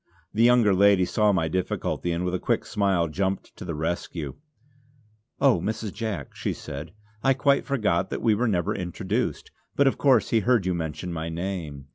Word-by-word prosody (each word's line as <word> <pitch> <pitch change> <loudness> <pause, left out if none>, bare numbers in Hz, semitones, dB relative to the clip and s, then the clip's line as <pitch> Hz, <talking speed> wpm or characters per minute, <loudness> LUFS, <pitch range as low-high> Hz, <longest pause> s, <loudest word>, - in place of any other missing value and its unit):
The 110 - +1
younger 120 -4 +5
lady 100 -1 +5
saw 105 +3 +2
my 85 -5 +1
difficulty, 90 0 -2
and 85 +2 -1
with 90 - -1
a 90 - 0
quick - - 0
smile 95 -5 +1
jumped 95 +4 -2
to - - -9
the 85 -4 -4
rescue. 80 -2 -3 1.1
"Oh 135 -9 +4
Mrs. 110 +1 -3
Jack" 100 - -4
she - - -2
said 75 +4 -7 0.3
"I 135 0 +4
quite 140 +1 +2
forgot 105 -10 +1
that - - -4
we 110 - +4
were 115 +4 +1
never 100 0 0
introduced; 95 +5 -3 0.2
but 140 - +4
of 135 - +2
course 130 -6 +4
he 115 - +4
heard 115 -3 +2
you 90 - +1
mention 80 +1 -4
my 80 0 -3
name. 80 -5 -5
95 Hz, 185 wpm, -25 LUFS, 85-110 Hz, 1.1 s, younger